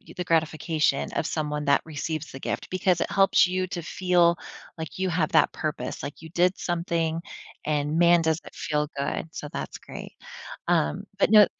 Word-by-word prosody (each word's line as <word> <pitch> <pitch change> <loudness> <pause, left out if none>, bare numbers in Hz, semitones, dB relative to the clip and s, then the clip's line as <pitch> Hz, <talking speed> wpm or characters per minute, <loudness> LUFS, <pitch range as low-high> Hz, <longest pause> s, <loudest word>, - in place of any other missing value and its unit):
the 180 - -2
gratification 160 -2 +1
of - - -1
someone 150 -2 -2
that 140 - +4
receives 155 0 -4
the 135 - -8
gift - - -3
because 185 -2 +1
it - - 0
helps 195 -2 +5
you 185 +1 0
to 175 -1 -4
feel 175 0 +3 0.4
like 160 +2 -6
you 190 0 +1
have 170 0 0
that - - +4
purpose, 150 -5 -4
like 145 +1 -6
you 160 - -10
did 180 +3 +2
something 170 -2 -1 0.5
and 150 +1 0
man, 170 0 +6
does 160 0 +1
it - - -11
feel 150 -1 -1
good, 140 +3 -2
so 150 - -6
that's - - -5
great. - - -9 0.5
Um, 75 0 +1
but, - - +3
no, 210 -2 +9
165 Hz, 180 wpm, -26 LUFS, 150-175 Hz, 0.5 s, no